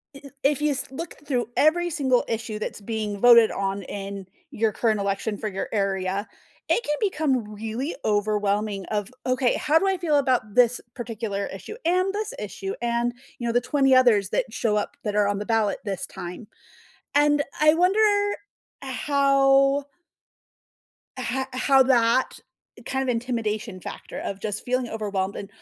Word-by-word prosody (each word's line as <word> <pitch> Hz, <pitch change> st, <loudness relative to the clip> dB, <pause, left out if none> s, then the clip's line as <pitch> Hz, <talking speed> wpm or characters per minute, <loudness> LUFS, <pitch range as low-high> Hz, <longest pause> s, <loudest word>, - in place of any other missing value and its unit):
i 275 Hz, -, -11 dB
i -, -, -9 dB
if 290 Hz, +1 st, +2 dB
you 300 Hz, -1 st, +2 dB
s 280 Hz, -, -2 dB
look 330 Hz, +5 st, -6 dB
through 245 Hz, -5 st, 0 dB
every 345 Hz, +3 st, +3 dB
single 265 Hz, -6 st, +2 dB
issue 225 Hz, -1 st, -3 dB
that's 215 Hz, -, -5 dB
being 210 Hz, -1 st, -3 dB
voted 235 Hz, -1 st, +7 dB
on 195 Hz, 0 st, -2 dB
in 195 Hz, 0 st, -6 dB, 0.3 s
your 220 Hz, 0 st, +1 dB
current 215 Hz, -1 st, +1 dB
election 200 Hz, +1 st, -2 dB
for 215 Hz, -, -4 dB
your 195 Hz, 0 st, -4 dB
area, 195 Hz, 0 st, -1 dB, 0.4 s
it 470 Hz, -, +3 dB
can 295 Hz, -, 0 dB
become 275 Hz, -, 0 dB
really 225 Hz, +8 st, -4 dB
overwhelming 205 Hz, -1 st, 0 dB
of, 210 Hz, 0 st, -2 dB, 0.2 s
"Okay, 255 Hz, -1 st, +2 dB
how 305 Hz, +1 st, +3 dB
do 390 Hz, -, 0 dB
I 380 Hz, -1 st, +1 dB
feel 315 Hz, -4 st, +1 dB
about 250 Hz, -7 st, 0 dB
this 245 Hz, -1 st, +4 dB, 0.2 s
particular 220 Hz, -4 st, -4 dB
issue? 195 Hz, -, -8 dB
And 370 Hz, +3 st, +2 dB
this 430 Hz, +3 st, -3 dB
issue 390 Hz, -4 st, -5 dB
and" 235 Hz, 0 st, 0 dB, 0.3 s
you 240 Hz, -, -3 dB
know, 230 Hz, -, 0 dB
the 245 Hz, -, +3 dB
20 270 Hz, 0 st, +2 dB
others 220 Hz, -7 st, +4 dB
that -, -, 0 dB
show 215 Hz, -3 st, 0 dB
up 210 Hz, +7 st, -3 dB
that 210 Hz, -3 st, -2 dB
are 210 Hz, -1 st, +3 dB
on 200 Hz, -1 st, -1 dB
the 210 Hz, -, -4 dB
ballot 225 Hz, -3 st, +1 dB
this 195 Hz, -2 st, -3 dB
time. 180 Hz, +4 st, -8 dB, 0.7 s
And 290 Hz, 0 st, +4 dB, 0.2 s
I 305 Hz, 0 st, +7 dB
wonder 390 Hz, +5 st, +4 dB, 0.7 s
how 275 Hz, 0 st, +3 dB, 1.3 s
ho 255 Hz, +2 st, -2 dB
how 265 Hz, +1 st, +4 dB
that, 245 Hz, -1 st, +2 dB, 0.5 s
kind 265 Hz, 0 st, -1 dB
of 260 Hz, -, -4 dB
intimidation 225 Hz, -4 st, -3 dB
factor -, -, -8 dB
of 200 Hz, 0 st, -5 dB
just 210 Hz, 0 st, -4 dB
feeling 250 Hz, 0 st, -1 dB
overwhelmed. 200 Hz, -3 st, -2 dB
And 200 Hz, -, -6 dB
235 Hz, 165 wpm, -24 LUFS, 210-275 Hz, 1.3 s, voted